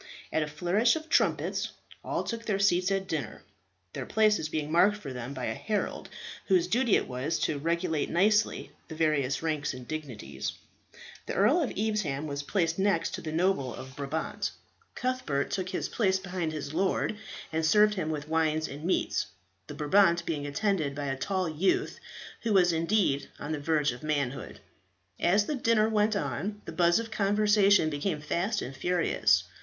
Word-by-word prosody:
At 160 - +2
a 150 - -1
flourish 180 - +2
of 320 0 -6
trumpets - - +1 0.3
all - - -2
took 230 -1 -5
their 205 -3 +1
seats 185 -2 +3
at 195 -1 -1
dinner, 140 -11 -4 0.5
their - - -5
places 210 -7 +2
being 155 -1 -3
marked 185 +5 +4
for 140 -10 -7
them 125 +1 -6
by 130 - -3
a 110 - -1
herald, 210 - -3 0.4
whose 185 -3 +4
duty 230 +4 +2
it - - +1
was 130 +6 -2
to 145 - 0
regulate 165 0 0
nicely 210 +5 +2 0.2
the 160 - -8
various 150 -3 +1
ranks 150 -4 -1
and 125 -1 -10
dignities. 125 - -5 0.7
The - - -3
Earl 260 - +4
of 285 - 0
Evesham 200 -10 -1
was 140 -1 -3
placed 165 +2 0
next 190 -4 +1
to 160 - -5
a - - -4
noble 160 -6 +1
of 130 0 -10
Brabant. 145 +3 -3 0.5
Cuthbert 250 - -1
took 190 -2 -2
his - - -2
place 190 -5 +1
behind 180 -4 -3
his 150 -2 -5
lord 190 +4 0 0.4
and 160 0 0
served 210 +6 +5
him 185 -6 -2
with 150 -1 -4
wines 160 -1 +1
and 145 +3 -8
meats, 185 - 0 0.4
the 145 - -7
Brabant 170 +3 +3
being 145 -3 -2
attended 155 -2 0
by 145 -1 -3
a 135 - -1
tall 185 +6 -1
youth, 160 +4 0 0.4
who 225 -2 0
was 180 -3 +5
indeed 165 -3 +1
on 145 - -5
the 155 - -2
verge 150 -1 +1
of 125 - -9
manhood. 145 -4 -3 0.6
As 200 +4 +3
the 300 - -2
dinner 230 -5 +3
went 215 0 +2
on 205 +1 -3
the - - -6
buzz 170 -1 +3
of 230 0 -4
conversation 205 -4 +3
became 150 +2 -2
fast 180 +8 -1
and 135 - -7
furious. 110 - +2
170 Hz, 175 wpm, -29 LUFS, 150-205 Hz, 0.7 s, served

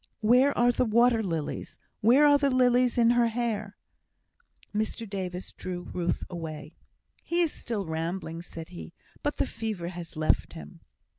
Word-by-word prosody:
"Where 250 +6 +4
are 240 +1 +5
the 245 - +1
water 235 0 +4
lilies? 165 -7 -4 0.2
Where 250 +7 +6
are 290 -1 +6
the 280 -1 +2
lilies 250 -1 +3
in 235 -1 +5
her 240 -1 +4
hair?" 220 -3 -2 1.0
Mr 220 +2 -2
Davis 185 -2 -5
drew 180 -1 -6
Ruth 175 -1 -1
away. 160 -2 -7 0.5
"He 345 +1 0
is 330 -3 +1
still 215 -5 -4
rambling," 165 +1 -3
said 165 -2 -9
he, 80 -2 -9 0.3
"but - - -2
the - - +1
fever 215 -6 -4
has 170 -2 -8
left 155 0 +1
him." 75 -1 -10
210 Hz, 155 wpm, -28 LUFS, 170-240 Hz, 1.0 s, Where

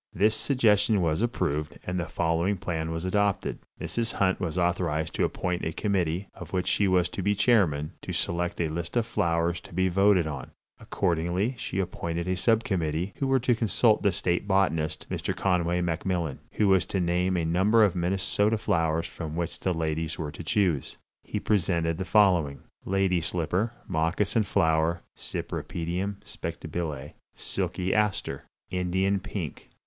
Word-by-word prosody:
This 105 +4 +3
suggestion 110 -3 +3
was 80 0 +1
approved, 75 - -1
and 90 0 -2
the 85 - -1
following 85 +5 0
plan 80 -4 -3
was 80 +2 -3
adopted: 100 +1 0 0.2
Mrs. 115 -1 -2
Hunt 95 -1 +1
was 90 -1 -3
authorized 85 -3 0
to - - +2
appoint 90 -1 -2
a 80 - -1
committee, 95 -1 -1
of 90 0 -10
which 90 -1 0
she 100 - +2
was 90 -2 +3
to - - -5
be 105 +2 +2
chairman, 85 -11 +3
to - - -6
select 85 0 -1
a 85 - +1
list 85 +6 -3
of 115 - +2
flowers 85 -2 0
to - - -14
be 95 +1 +2
voted 95 -1 +4
on. 75 -4 -5 0.3
Accordingly 90 +5 0
she - - -4
appointed 85 -2 -2
a 95 - +1
subcommittee, 95 -5 0
who 135 - 0
were 135 0 +3
to 125 0 +3
consult 115 0 +3
the 100 - +3
state 90 +1 -1
botanist, 80 -6 +1
Mr. - - -2
Conway 90 -2 +1
MacMillan, 85 -3 -1
who 105 - +2
was 95 -2 +5
to 95 - -1
name 90 +1 +1
a 85 - 0
number 95 +7 +4
of 100 -4 +3
Minnesota 95 +4 +1
flowers 80 -6 +1
from 80 -2 -6
which 85 0 -3
the 95 - 0
ladies 80 -1 -2
were 75 -3 -4
to 80 - -8
choose. 90 - 0 0.3
He - - -3
presented 85 -5 +1
the 95 - -2
following: 90 -8 +3 0.2
Lady 95 -2 +2
Slipper 90 +6 -1 0.2
(Moccasin 95 +7 +1
Flower 80 -3 +2
Cypripedium 90 +4 -3
Spectabile). 75 -5 -5 0.2
Silky 95 +1 -1
Aster. 105 -2 0 0.3
Indian 95 +2 +1
Pink. 90 -6 -6
90 Hz, 160 wpm, -27 LUFS, 80-100 Hz, 0.3 s, was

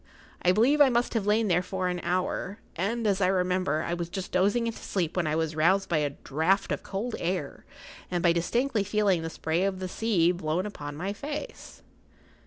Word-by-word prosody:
I 180 - +4
believe 250 +10 +4
I 280 - +8
must 240 0 +1
have 215 -4 -1
lain 215 +1 +3
there 175 -2 +3
for 185 0 -2
an 180 0 -2
hour,[Pg 185 +3 -3
41] 190 +5 0
and, 235 -1 -3
as 200 -2 +2
I 180 - +4
remember, 180 -4 +1
I 170 - -2
was 170 -1 -3
just 190 +1 -5
dozing 205 +6 +2
into 230 -1 -3
sleep 175 -5 -2
when 175 -3 0
I 155 - 0
was 160 -1 -1
roused 190 +5 +3
by 165 - +2
a 145 -1 +1
draught 160 +7 0
of - - -1
cold 215 +5 -4
air 170 -4 -3 0.4
and 175 -2 -1
by 170 -1 +5
distinctly 225 +6 0
feeling 205 -3 +1
the 165 - -4
spray 160 +2 -1
of 195 -1 0
the 185 0 -4
sea 180 -4 +2
blown 175 +1 -2
upon 145 -8 -6
my 190 +6 -3
face. 290 +8 -7
185 Hz, 210 wpm, -28 LUFS, 170-210 Hz, 0.4 s, I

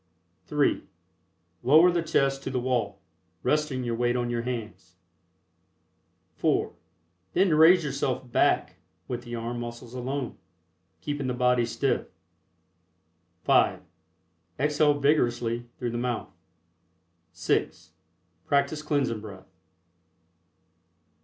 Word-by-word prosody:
(3) 150 -1 +1 0.8
Lower 155 +8 +6
the 170 -1 +1
chest 135 -4 +1
to - - -4
the 130 - -1
wall, 120 -6 -2 0.4
resting 150 -4 0
your 120 -1 -2
weight 120 +1 +1
on 120 -1 -1
your 120 -1 -1
hands. 115 -3 -6 1.4
(4) - - +1 0.6
Then 185 -2 +3
raise 165 +3 +6
yourself 135 -3 -2
back - - +2 0.3
with 125 -1 -4
the 120 -1 -7
arm 120 +1 -4
muscles 120 0 -7
alone, 130 0 -4 0.6
keeping 145 -2 -3
the 125 - -1
body 125 -1 +2
stiff. 115 - -1 1.4
(5) - - +3 0.8
Exhale 150 0 +2
vigorously 120 -5 +1
through 120 -2 -3
the 120 - -3
mouth. 120 -2 -3 1.0
(6) 85 0 -1 0.6
Practice 140 +2 +1
Cleansing 140 -7 -1
Breath. 100 -3 -12
125 Hz, 105 wpm, -27 LUFS, 120-145 Hz, 1.4 s, Lower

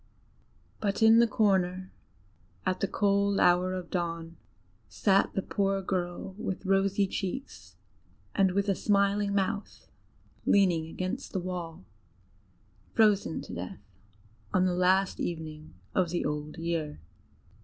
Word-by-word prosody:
But 205 +1 0
in 225 +1 +7
the 235 - +5
corner, 190 -4 +1 0.7
at 185 -1 0
the 195 - 0
cold 200 0 +1
hour 180 +1 +3
of 180 -2 -6
dawn, 165 -2 -3 0.5
sat 195 -1 +2
the 195 - 0
poor 195 -1 0
girl, 180 0 -3
with 190 -1 -4
rosy 195 +1 +2
cheeks 195 +8 -5 0.6
and 190 -2 +3
with 200 +1 +1
a 200 - +3
smiling 200 +1 +1
mouth, 200 +1 -2 0.5
leaning 175 -5 +3
against 185 +3 -4
the 190 - 0
wall 175 - -6 1.1
frozen 210 -6 +3
to - - -9
death 90 +1 -6 0.7
on 185 - +3
the 180 - +1
last 185 +2 +2
evening 155 - -5 0.2
of 185 -3 +2
the 175 +1 -1
old 150 +2 -3
year. 165 -2 -3
185 Hz, 125 wpm, -29 LUFS, 175-200 Hz, 1.1 s, in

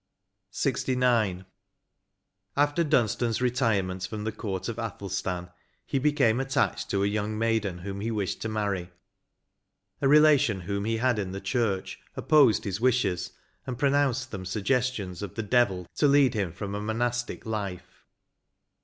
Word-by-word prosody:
J - - +1
88 130 -1 -2
LXIX. 110 -7 +2 1.1
After 145 +3 +3
Dunstan's 120 -5 +1
retirement 105 -8 0
from 105 -1 -5
the 110 - -2
court 95 -3 -4
of 115 -1 -4
Athelstan, 95 -5 -4 0.3
he 135 - -1
became 135 -5 +2
attached 135 +1 0
to 100 0 +1
a - - +3
young 105 +1 -2
maiden 110 -5 0
whom 100 +2 -6
he 110 - -2
wished 105 -4 -2
to 110 - -2
marry; 100 -5 -2 1.1
a 140 - +3
relation 145 -8 +5
whom 100 +3 -3
he 115 +1 0
had 120 -1 +1
in 95 -2 -3
the 95 - -4
church, 110 -5 -1 0.2
opposed 140 -9 +4
his 100 +1 -3
wishes, 120 -8 +1 0.3
and 125 -2 -3
pronounced 135 -2 +1
them 95 -3 -5
suggestions 105 -1 -1
of 100 -4 -6
the 110 - -2
devil 100 -5 +2
to 145 - +4
lead 140 -2 +5
him 100 -6 -1
from 100 +4 -6
a 105 - -3
monastic 120 +3 -2
life. 100 -5 -5
110 Hz, 155 wpm, -27 LUFS, 100-125 Hz, 1.1 s, relation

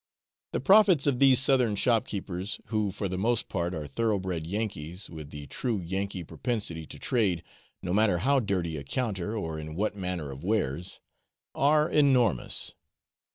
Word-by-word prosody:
The - - 0
profits 195 -7 +6
of 135 -4 +2
these 135 -2 +6
southern 130 -5 +3
shopkeepers 100 -4 -1
(who, 105 -2 0
for 100 +1 -3
the 95 0 -3
most 115 +3 +1
part, 90 -1 -2
are 75 -2 -4
thoroughbred 95 0 -1
Yankees, 95 -3 -4
with 80 -3 -8
the 75 -1 -8
true 115 - -2
Yankee 95 +1 -3
propensity 85 - -3
to - - -9
trade, 95 -9 0 0.4
no 90 - -2
matter 105 -2 +4
on - - -1
how 140 +1 +3
dirty 90 -8 -1
a 70 - -6
counter, 105 - -2
or 80 -6 -3
in 80 0 -7
what 105 +3 -1
manner 90 -7 -3
of 70 +1 -9
wares) 90 -6 -1 0.5
are 150 +2 +3
enormous. 130 - +2
100 Hz, 160 wpm, -28 LUFS, 85-115 Hz, 0.5 s, profits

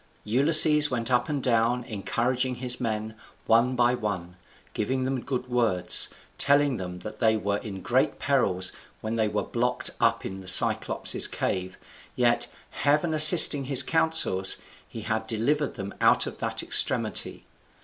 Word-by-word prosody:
Ulysses 150 +5 +5
went 120 -1 -3
up 125 +2 0
and 145 -3 -4
down 120 0 0
encouraging 125 +3 -3
his 125 0 -3
men, 110 -2 -4 0.3
one 115 +3 +2
by 120 0 +1
one, 95 -7 -5 0.4
giving 130 +5 -3
them 130 -1 -3
good 125 -2 -5
words, 115 -7 +1 0.3
telling 140 -2 +2
them 90 -1 -7
that 110 - -10
they 110 -2 +1
were 100 -1 -2
in 95 -4 -9
greater - - 0
perils 95 0 -1 0.3
when 110 +1 -4
they 110 -1 0
were 105 0 -3
blocked 125 +1 -3
up - - 0
in 95 0 -7
the 95 - -14
Cyclop's 95 - +2
cave, 95 0 -4 0.4
yet, - - +1 0.2
Heaven 150 +3 -1
assisting 155 -2 +7
his 135 -1 +5
counsels, 160 - +2 0.3
he 115 - -10
had 110 0 -4
delivered 135 +7 -2
them 100 -3 -8
out - - +3
of - - -8
that - - -3
extremity. - - 0
120 Hz, 150 wpm, -25 LUFS, 105-135 Hz, 0.4 s, assisting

